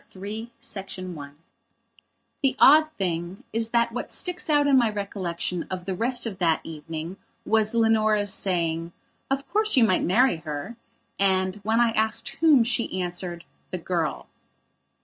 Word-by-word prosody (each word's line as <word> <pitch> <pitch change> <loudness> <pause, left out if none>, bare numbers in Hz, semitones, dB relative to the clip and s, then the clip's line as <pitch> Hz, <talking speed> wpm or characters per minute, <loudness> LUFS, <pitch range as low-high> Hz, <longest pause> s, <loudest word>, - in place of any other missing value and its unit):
PART 190 - -12
III 220 +3 -6 0.5
I 170 -6 -7 1.1
THE 270 -2 +2
odd 310 +2 +7
thing 175 0 -3
is 225 0 -1
that 235 0 +2
what 245 - -5
sticks 360 -2 -2
out 290 -1 +4
in 280 -1 +4
my 240 -4 +4
recollection 185 -4 -3
of 185 -1 -5
the 190 - -2
rest 245 +6 0
of 205 -4 -5
that 165 -3 +2
evening 160 +3 -7 0.3
was 220 0 +2
Leonora's 215 -3 +3
saying: 170 -3 -1 0.4
"Of 275 +1 -2
course 430 -5 +2
you 250 - +7
might 185 -5 +3
marry 235 +2 +3
her," 155 +7 -6 0.4
and, 190 0 +2
when 220 +3 0
I 240 -1 +4
asked 220 +2 0
whom, 305 -7 +5
she 230 -5 -1
answered: 175 -1 -4 0.3
"The 185 - -4
girl." 170 -2 -2
205 Hz, 150 wpm, -25 LUFS, 175-235 Hz, 1.1 s, odd